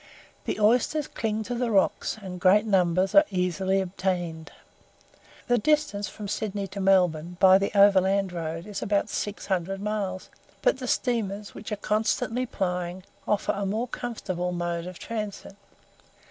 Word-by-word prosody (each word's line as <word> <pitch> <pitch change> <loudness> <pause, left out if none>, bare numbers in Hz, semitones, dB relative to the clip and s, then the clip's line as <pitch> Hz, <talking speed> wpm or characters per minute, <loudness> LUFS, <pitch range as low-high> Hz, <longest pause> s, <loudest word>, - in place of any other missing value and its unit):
The - - -2
oysters 245 +8 +2
cling 220 -1 -2
to 245 - -4
the 245 0 -1
rocks, 200 +1 +1
and 185 -3 -7
great 205 +3 +5
numbers 185 -2 +2
are 300 - +8
easily 190 +1 0
obtained. 175 -3 -3 1.0
The 245 -1 +3
distance 210 -7 +1
from 210 -1 -8
Sydney 200 0 -3
to 200 - -7
Melbourne, 180 -3 +2
by 190 0 +7
the 200 - 0
overland 195 -1 +4
road, 165 0 -4
is 205 -1 -6
about 205 +1 0
six 205 0 -4
hundred 190 0 -1
miles; 200 -3 -3 0.3
but - - +3
the - - -5
steamers, 210 -5 -1
which 215 - -9
are - - 0
constantly 220 +4 0
plying, 180 -2 -3 0.2
afford 205 -1 0
a 200 - -1
more 220 +5 -1
comfortable 190 -8 -4
mode 175 -1 -3
of 180 -1 -8
transit. 210 -3 -6
195 Hz, 150 wpm, -26 LUFS, 180-215 Hz, 1.0 s, are